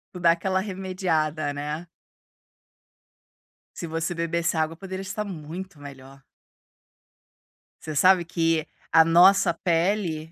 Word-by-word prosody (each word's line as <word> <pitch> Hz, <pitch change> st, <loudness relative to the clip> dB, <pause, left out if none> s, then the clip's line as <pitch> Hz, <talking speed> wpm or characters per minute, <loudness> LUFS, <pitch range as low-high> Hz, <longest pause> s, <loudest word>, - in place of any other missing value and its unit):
Tu -, -, -6 dB
dá 170 Hz, -1 st, +6 dB
aquela 185 Hz, +2 st, 0 dB
remediada, 180 Hz, -6 st, -2 dB
né. 150 Hz, +4 st, -5 dB, 1.9 s
Se 170 Hz, -, -5 dB
você 165 Hz, +2 st, -3 dB
bebesse 170 Hz, 0 st, -1 dB
água 160 Hz, 0 st, 0 dB
poderia 190 Hz, 0 st, -6 dB
estar 195 Hz, +2 st, -4 dB
muito 175 Hz, 0 st, -8 dB
melhor. 135 Hz, -1 st, -12 dB, 1.6 s
Você 155 Hz, -1 st, -6 dB
sabe 185 Hz, +2 st, +5 dB
que 165 Hz, -2 st, 0 dB, 0.3 s
a 160 Hz, 0 st, +7 dB
nossa 175 Hz, +2 st, +5 dB
pele, 170 Hz, -2 st, -1 dB
170 Hz, 110 wpm, -25 LUFS, 155-185 Hz, 1.9 s, a